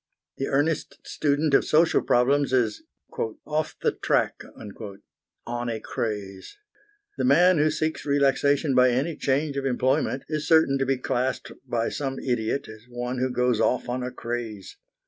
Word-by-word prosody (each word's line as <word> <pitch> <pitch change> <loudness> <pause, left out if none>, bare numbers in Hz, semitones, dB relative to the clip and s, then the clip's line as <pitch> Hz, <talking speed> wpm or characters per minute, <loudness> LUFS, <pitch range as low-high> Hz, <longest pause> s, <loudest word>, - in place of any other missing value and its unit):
The 135 - -2
earnest 145 0 0
student 150 0 0
of - - +5
social 160 +2 +3
problems 135 +3 +2
is 115 -5 +1 0.6
"off 155 +1 -2
the - - +3
track," - - 0 1.0
on 120 0 -3
a 115 -1 -3
craze. 105 - -5 0.6
The - - +1
man 165 +6 +5
who 155 +1 +4
seeks 155 +1 -2
relaxation 140 0 +2
by 125 0 +5
any 135 +7 0
change 140 +1 -1
of 135 - -2
employment 130 +1 0
is 155 -1 -3
certain 160 -4 +4
to 135 - 0
be 135 -1 +1
classed 130 0 -2 0.2
by 115 -2 0
some 135 -2 -3
idiot 120 0 -2
as 110 +2 -13
one 125 +1 -4
who 130 +1 0
goes 125 -2 +1
off 125 - +1
on 125 +1 -2
a 125 - -3
craze. 115 -5 -6
130 Hz, 155 wpm, -25 LUFS, 120-145 Hz, 1.0 s, of